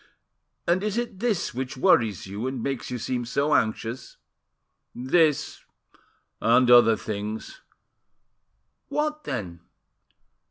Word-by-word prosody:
"And 175 +2 +2
is 210 +1 -2
it 235 -5 -3
this 215 -6 -1
which 130 +1 -5
worries 110 -6 +3
you, 100 +6 -4
and 130 -3 -4
makes 135 -3 -3
you 125 - -3
seem 125 +1 -3
so 140 +5 0
anxious?" 115 +2 -1 0.8
"This 150 +4 +1 0.8
and 125 +2 +4
other 115 -2 +7
things." 105 +1 -6 1.3
"What, 305 0 -2
then?" 95 -10 -5
125 Hz, 110 wpm, -25 LUFS, 115-165 Hz, 1.3 s, other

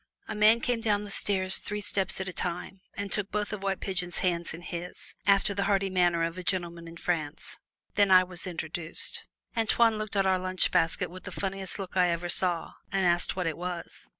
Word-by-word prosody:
A - - -3
man 215 +2 +5
came 245 -2 0
down 210 -2 +1
the 205 - -8
stairs 190 -2 0
three 210 0 -4
steps 200 -2 +1
at 190 - -3
a 180 - -4
time, 180 +2 -4
and 200 -1 -4
took 205 0 0
both 210 0 -2
of 210 - -4
White 195 -1 -1
Pigeon's 180 -2 -1
hands 170 -2 0
in 170 +2 -8
his, 175 0 -6 0.3
after 200 +1 +4
the 200 0 -1
hearty 195 -2 +1
manner 175 -2 +3
of 165 +2 -2
a - - -6
gentleman 170 -2 -2
of 165 0 -10
France. 160 -4 -3 0.4
Then 205 -1 +4
I 185 -1 +8
was 180 0 0
introduced. 165 -1 -2 0.3
Antoine 225 0 +3
looked 215 0 -4
at 195 -1 +3
our 190 -1 +3
lunch 185 0 +1
basket 165 +1 +1
with 185 +1 -11
the - - -6
funniest 195 -1 -3
look 190 -3 -7
I 180 -1 +4
ever 170 +1 -2
saw, 175 -2 0 0.2
and 195 -1 +1
asked 175 0 +4
what 185 -1 -1
it 160 -2 -1
was. 175 0 -6
185 Hz, 215 wpm, -29 LUFS, 175-200 Hz, 0.4 s, I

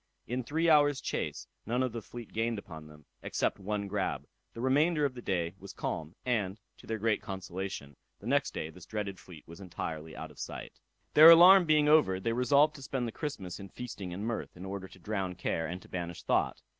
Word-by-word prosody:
In 125 +2 -3
three 160 +7 0
hours' 145 -3 +5
chase - - -3 0.2
none 125 +4 0
of 130 - -1
the 115 0 -5
fleet 120 +1 -10
gained 115 +1 0
upon 80 -6 -9
them, 75 -1 -16 0.2
except - - -1
one 100 +1 -3
grab. 95 -9 -2 0.3
The - - -9
remainder 145 +5 +3
of 135 - -1
the 125 - -8
day 85 -5 -1
was 100 - -10
calm, 80 +2 -4
and, 105 -5 -1 0.2
to - - -15
their 110 - -2
great 110 0 +1
consolation, 95 -5 -6 0.2
the - - -14
next 140 +3 +1
day 80 - -5
this 90 0 -14
dreaded 100 -4 -4
fleet 90 -4 -14
was 85 0 -11
entirely 80 -4 -6
out - - -7
of - - -17
sight. - - -7 0.3
Their 155 +2 +10
alarm 180 +3 +9
being 155 -2 +4
over, 150 -12 +5
they 115 +4 -1
resolved 140 +5 +4
to - - -11
spend 130 -2 -2
the - - -4
Christmas 105 - -5
in 100 -1 -9
feasting 100 -5 -7
and 95 +4 -4
mirth, 115 -5 -4
in 90 - -8
order 95 -1 -5
to 95 - -16
drown 95 -1 -3
care, 80 -2 -2
and 90 +3 -5
to - - -15
banish 85 -2 -5
thought. - - 0
105 Hz, 215 wpm, -31 LUFS, 90-130 Hz, 0.3 s, Their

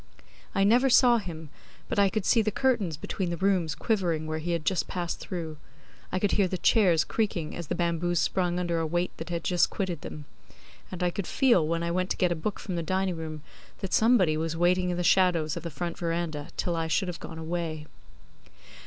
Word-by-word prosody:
I 195 - +3
never 245 +6 +4
saw 245 -1 +6
him, 160 -6 -8 0.4
but - - -1
I 200 -1 +5
could 210 -1 -2
see 230 - +4
the 215 - 0
curtains 210 - 0
between 180 +3 -3
the 170 - -3
rooms 185 -4 +1
quivering 175 -8 0
where 155 0 -3
he 165 +3 -5
had 165 -2 -2
just 190 - +1
passed 175 -2 -3
through; 165 -4 -5 0.5
I - - 0
could 200 +1 +1
hear 200 -2 +3
the 185 - -3
chairs 175 -5 +4
creaking 190 -8 -2
as 170 -3 -6
the - - -2
bamboos 170 0 0
sprung 175 +3 0
under 170 -2 0
a 165 - -1
weight 175 +3 -1
that 160 - -7
had 170 -2 -3
just 180 -1 +2
quitted 180 -6 -3
them; 150 -1 -8 0.7
and 180 0 -4
I 175 - +2
could 195 0 -4
feel 235 - +3
when 165 +1 -1
I 170 - -1
went 185 +1 -1
to - - -1
get 180 -1 +2
a - - +1
book 190 +6 -3
from 185 -5 -4
the - - 0
dining 185 +2 -1
room 155 -2 -6 0.4
that 195 - -4
somebody 220 -9 +4
was 165 +1 -2
waiting 180 +1 +2
in 175 - -1
the 175 - -1
shadows 175 -4 +3
of 170 - -5
the 170 - -5
front 170 +2 -5
verandah 165 -3 -2
till 175 - -1
I 165 -1 -1
should 190 +4 +1
have 175 -1 -5
gone 160 - -8
away. 160 -1 -4
175 Hz, 225 wpm, -28 LUFS, 165-190 Hz, 0.7 s, saw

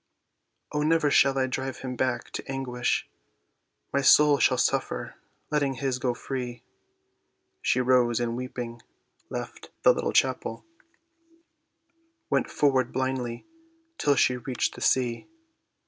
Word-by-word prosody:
"O, 150 - -1
never 155 -1 +2
shall 135 -1 +4
I 130 - +2
drive 130 +1 -4
him 130 -1 -4
back 130 +1 -1
to - - -6
anguish, 125 -2 -1 0.9
My 140 - +2
soul 145 +1 +6
shall - - +3
suffer, - - -1 0.4
letting 145 -3 +1
his 130 -1 -2
go 125 -1 -1
free." 125 -2 -5 1.0
She 125 - +2
rose, 125 -2 +3
and 120 -1 -1
weeping, 120 -2 -6 0.5
left - - -7
the - - +7
little - - -2
chapel, - - 0 1.7
Went 140 - +1
forward 130 -4 +2
blindly 130 -2 -2 0.5
till 145 -1 +3
she 125 -1 +3
reached 125 +1 -2
the - - -11
sea. 120 -3 +1
130 Hz, 125 wpm, -27 LUFS, 125-135 Hz, 1.7 s, the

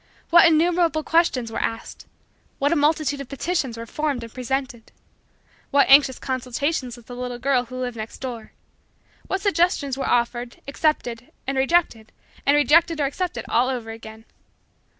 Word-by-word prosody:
What 340 0 +8
innumerable 330 0 +2
questions 290 -8 +1
were - - -3
asked! 225 0 -5 0.5
What 285 +2 +1
a - - +3
multitude 295 -1 +1
of 275 - -9
petitions 275 -4 -2
were 230 - -6
formed 285 0 -2
and 230 - -10
presented! 255 -2 -4 0.8
What 280 0 +4
anxious 275 -2 +6
consultations 255 0 -3
with 240 - -16
the 245 - -9
little 250 0 -5
girl 255 0 +1
who 255 +2 -8
lived 245 -2 -4
next 220 +1 -7
door! 240 -4 -7 0.8
What 380 - -2
suggestions 335 -8 +1
were - - -2
offered, 240 0 -1
accepted 250 -5 -1
and 270 - -2
rejected, 265 -5 +1 0.4
and 285 - +5
rejected 310 +3 +4
or 285 - +2
accepted 280 -4 -3
all 250 +2 +2
over 240 -4 -4
again! 225 0 -11
265 Hz, 155 wpm, -23 LUFS, 240-310 Hz, 0.8 s, What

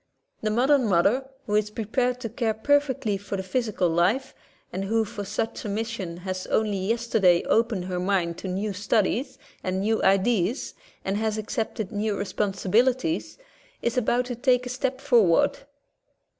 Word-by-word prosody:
The 215 - 0
modern 255 +3 +3
mother 210 +9 +2 0.2
who 210 - -3
is 210 0 +2
prepared 245 +4 -1
to 230 - -3
care 225 -1 -1
perfectly 260 -4 +1
for 200 0 -4
the 190 - -3
physical 210 -2 0
life, 180 +11 +1 0.4
and 195 +1 -2
who 225 +2 +1
for 205 0 -6
such 220 +3 -3
a 210 - -4
mission 205 -5 -3
has 185 +1 -5
only 215 -2 +1
yesterday 205 -4 +2
opened 225 -5 +1
her 180 -1 -3
mind 180 -3 0
to - - -6
new 195 +3 -2
studies 225 +6 0 0.3
and 185 0 -1
new 220 +2 +1
ideas 195 +4 +2 0.3
and 195 +1 0
has 220 0 -1
accepted 220 -2 -3
new 210 0 -1
responsibilities, 215 - 0 0.5
is 235 - 0
about 250 0 +1
to 245 -1 -4
take 250 +1 +2
a - - -4
step 260 +1 -2
for 260 -5 +5
ward. 170 -5 +3
215 Hz, 160 wpm, -25 LUFS, 195-245 Hz, 0.5 s, for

